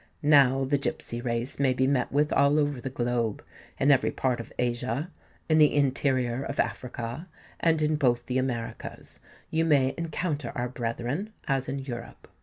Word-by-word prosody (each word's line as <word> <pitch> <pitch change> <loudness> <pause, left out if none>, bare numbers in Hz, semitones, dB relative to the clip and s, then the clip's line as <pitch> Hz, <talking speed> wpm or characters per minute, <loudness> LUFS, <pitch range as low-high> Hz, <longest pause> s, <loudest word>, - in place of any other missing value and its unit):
Now 135 -3 +5
the 140 +1 +1
gipsy 130 -5 -3
race 120 +2 -2
may 135 -2 +3
be 130 - +2
met 130 -2 +1
with 150 +2 +2
all 140 +1 +4
over 145 -4 0
the 135 - -4
globe: 120 -4 -1 0.4
in 140 +2 +4
every 135 - +4
part 130 -2 -1
of 115 - -8
Asia, 125 +6 -1 0.4
in 155 -1 +4
the 150 -1 +5
interior 130 -3 +1
of 140 - -5
Africa, 125 +6 -3 0.3
and 160 -2 +2
in 155 0 +2
both 120 -4 +2
the 130 0 0
Americas, 120 -3 -4 0.3
you 160 0 +2
may 140 -4 +3
encounter 155 -5 -2
our 120 +1 -2
brethren, 125 - -3
as 135 -1 0
in 135 - -2
Europe. 130 -3 -7
135 Hz, 170 wpm, -27 LUFS, 120-145 Hz, 0.4 s, Now